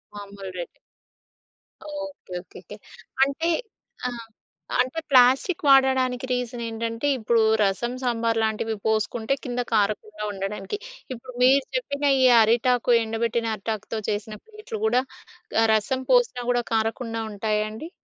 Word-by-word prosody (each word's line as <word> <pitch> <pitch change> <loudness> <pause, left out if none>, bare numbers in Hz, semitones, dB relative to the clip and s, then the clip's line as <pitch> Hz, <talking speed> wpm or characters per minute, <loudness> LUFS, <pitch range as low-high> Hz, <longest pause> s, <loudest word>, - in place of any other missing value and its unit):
మామూలు 200 -1 -8
రేటే. 175 - -7 1.1
ఓకే. 290 -9 -7
ఓకేకే. 180 - -12 0.5
అంటే 280 +5 0 0.6
ఆ! - - -1 0.7
అంటే 255 +6 -2
ప్లాస్టిక్ 265 +8 +4
వాడడానికి 260 -2 +4
రీజన్ 245 -1 -2
ఏంటంటే 230 +3 -3
ఇప్పుడు 230 0 +2 0.2
రసం, 205 +5 0
సాంబార్‌లాంటివి 225 -2 0
పోసుకుంటే 220 +3 0
కింద 245 -1 -2
కారకుండా 210 0 0
ఉండడానికి. 195 - -4 0.4
ఇప్పుడు 255 +1 -10
మీరు 270 +2 +5
చెప్పిన 290 -13 -2 0.2
ఈ - - +6 0.2
అరిటాకు 240 +2 +3
ఎండబెట్టిన 230 +1 -1
అరిటాకుతో 220 +1 -4
చేసిన 215 +1 -3
ప్లేట్‌లు 440 +1 -8
గూడా 255 -13 +3 0.6
ఆహ్, 225 - +4
రసం 220 +5 0
పోసినా 485 - +3
గూడా 245 -1 +1
కారకుండా 225 +1 -1
ఉంటాయా 210 +1 -1
అండి? 265 +10 -8
235 Hz, 115 wpm, -24 LUFS, 220-260 Hz, 1.1 s, ఈ